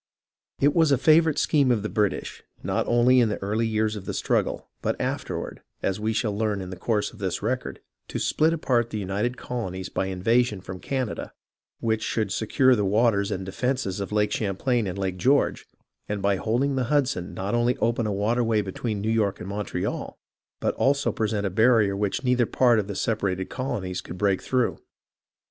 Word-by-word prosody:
It 145 +1 +4
was 160 -3 +4
a 140 - +5
favourite 155 +2 +4
scheme 145 -4 +3
of 115 -4 +2
the - - -1
British, 105 -2 -1 0.2
not - - -1
only 120 +2 +5
in 115 -3 +3
the 105 - -2
early 110 +3 -1
years 110 0 0
of 100 -3 -7
the - - -4
struggle, - - 0
but - - -1
afterward, - - -3 0.2
as 95 +1 0
we 110 +1 0
shall 110 -2 -1
learn 105 -1 0
in 95 -1 -6
the - - -5
course 105 +4 -1
of 110 - -14
this 95 -2 -2
record, 125 +3 -2 0.3
to - - -4
split 160 +1 +2
apart 125 -8 +1
the 110 - -4
united 105 +5 -2
colonies 95 -7 -4
by 95 - -1
an 95 - -3
invasion 115 +3 +2
from 95 0 -8
Canada, 130 -1 -3 0.5
which 110 -1 0
should 110 -3 -1
secure 130 +5 +3
the 105 - 0
waters 100 0 +2
and 95 -2 -3
defences 115 0 -2
of 100 0 -4
Lake 105 0 +1
Champlain 110 +3 0
and 95 +1 -4
Lake 95 -2 -2
George, 135 +9 +2 0.4
and 105 0 -1
by 100 0 +1
holding 125 +7 0
the 130 -1 0
Hudson 135 -9 0
not 95 +3 -3
only 120 +1 +2
open 115 0 0
a - - -1
waterway 110 +2 +1
between 100 +2 -3
New 110 +2 0
York 105 -3 +1
and - - -7
Montreal, 100 -3 -3 0.4
but - - 0
also 140 +1 +2
pre 110 - -1
sent 105 -1 -1
a 95 - -1
barrier 110 -1 +4
which 100 +6 -1
neither 125 -2 +2
part 120 -3 +4
of 100 - -2
the 100 - -5
separated 95 -4 -1
colonies 120 -9 -3
could 90 - -9
break 100 0 +1
through. 130 -2 0
110 Hz, 200 wpm, -25 LUFS, 100-125 Hz, 0.5 s, a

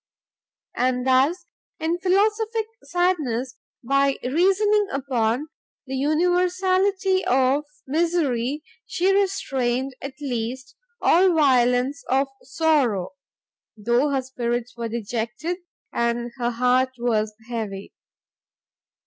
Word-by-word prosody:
And 250 0 0
thus, 275 +8 +2 0.3
in 330 +2 -1
philosophic 425 +4 +1 0.2
sadness, 275 -9 0 0.3
by 275 +2 +2
reasoning 390 +9 +2
upon 260 0 -1 0.4
the 265 - -7
universality 370 +5 +2
of 265 +3 +2 0.2
misery, 295 -3 0 0.2
she 375 +2 +1
restrained, 270 -10 0
at 275 -1 -6
least, 260 -1 -4 0.3
all 360 +1 +4
violence 260 -1 +3
of 270 +1 +2
sorrow, 265 - +1 0.7
though 240 +7 +2
her 270 -2 0
spirits 240 -2 -3
were 235 -1 -4
dejected, 235 - -3 0.4
and 235 0 -1
her 240 -1 +1
heart 250 +2 +2
was 220 -3 0
heavy. 215 -5 -5
270 Hz, 95 wpm, -23 LUFS, 240-350 Hz, 0.7 s, all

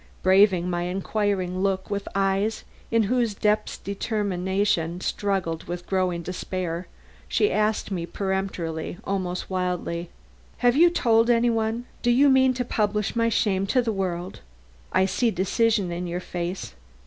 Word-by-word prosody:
Braving 190 -2 +5
my 175 -1 -1
inquiring 190 0 -1
look 195 0 -1
with 200 0 -2
eyes 195 +2 +1 0.3
in 230 -1 +3
whose 235 0 +1
depths 210 +1 0
determination 190 -4 -1
struggled 190 -5 -2
with 175 0 -5
growing 185 -3 0
despair, 180 -1 -4 0.4
she 420 - +2
asked 215 -1 0
me 170 -3 -2
peremptorily, 190 -4 -3
almost 185 -2 -2
wildly: 180 -2 -2 0.5
"Have 245 0 +3
you 340 +4 +7
told 230 -8 +3
any 240 0 +4
one? 225 +1 -1 0.2
Do 240 - +1
you 270 +4 +5
mean 260 -1 +4
to 250 0 -2
publish 210 -2 0
my 230 0 +2
shame 195 -3 +1
to 255 +5 +3
the 225 -2 -1
world? 185 -2 -3 0.5
I 190 - +3
see 230 +5 +1
decision 200 0 +1
in 175 +1 -3
your 175 +1 -3
face. 175 - -5
195 Hz, 145 wpm, -25 LUFS, 180-220 Hz, 0.5 s, you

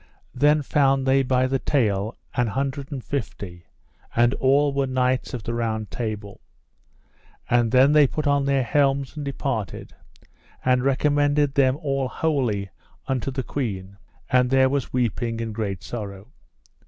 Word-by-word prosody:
Then 145 +3 +3
found 135 -1 +2
they 135 +1 +4
by 130 -1 +2
the 135 +1 0
tale 110 -6 0 0.2
an 125 -1 +1
hundred 135 +5 -3
and 135 -4 -5
fifty, 100 -9 -5 0.5
and 120 +2 +4
all 140 +2 +2
were 140 -1 0
knights 130 0 0
of 115 - -6
the 115 - -3
Round 110 -3 -2
Table. 105 -4 -5 1.1
And 120 -1 +3
then 130 +3 +5
they 150 -2 +6
put 155 +3 -3
on 140 -1 +2
their 140 -1 +2
helms 135 +2 +1
and 150 - -5
departed, 135 -6 -4 0.7
and 125 0 +3
recommended 145 +1 +2
them 135 -1 +3
all 135 -4 -1
wholly 125 - -1 0.3
unto 130 0 -1
the 130 0 -3
queen; 100 -8 -4 0.3
and 125 -1 +3
there 130 0 +4
was 140 -2 -2
weeping 120 -1 -1
and 115 -1 -4
great 105 -2 -3
sorrow. 100 -2 -7
130 Hz, 150 wpm, -24 LUFS, 115-140 Hz, 1.1 s, they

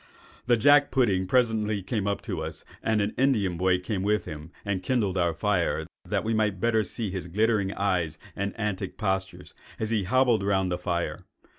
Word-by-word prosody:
"The 120 -1 +5
jack 145 +5 +6
pudding 100 -8 +2
presently 110 -4 +1
came 100 0 -2
up 100 - -1
to - - -3
us, - - -6 0.2
and 110 -1 +1
an 100 +1 -1
Indian 110 -10 +2
boy 90 +1 +2
came 95 +2 -3
with 105 +2 +1
him 75 +2 -8
and 100 -2 -1
kindled 100 -2 0
our 85 -2 +2
fire, 90 +1 0 0.2
that - - -1
we 115 - 0
might 105 -3 +1 0.3
see 110 -2 -3
his 95 -2 -4
glittering 105 +1 +1
eyes 90 -6 0 0.2
and 100 +3 -3
antic 100 -3 -3
postures, 95 -3 -2 0.3
as 110 0 -2
he 105 -4 +1
hobbled 125 0 +3
round 95 -2 +1
the 90 - -1
fire. 85 -2 -3
100 Hz, 180 wpm, -27 LUFS, 95-110 Hz, 0.3 s, jack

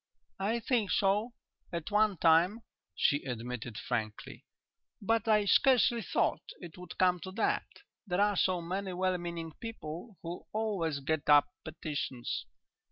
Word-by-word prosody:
"I 215 +5 0
think 230 -3 0
so, 210 +2 +2 0.4
at 170 +2 -4
one 210 -2 +3
time," 175 +8 +4 0.3
she 145 - +2
admitted 120 -2 -5
frankly. 110 -4 -4 0.5
"But 225 +1 0
I 210 -2 +4
scarcely 240 +1 +4
thought - - 0 0.2
it 175 -2 -10
would 180 -2 -10
come 180 -1 +3
to 185 - -7
that. 225 - 0 0.4
There 180 0 0
are 205 0 +3
so 180 -2 +1
many 190 +2 -3
well 185 0 0
meaning 170 -2 -5
people 205 -2 -7
who 170 +1 -6
always 190 -10 -1
get 155 +1 -1
up 145 -1 +7
petitions.... 145 - -4
180 Hz, 140 wpm, -31 LUFS, 155-210 Hz, 0.5 s, up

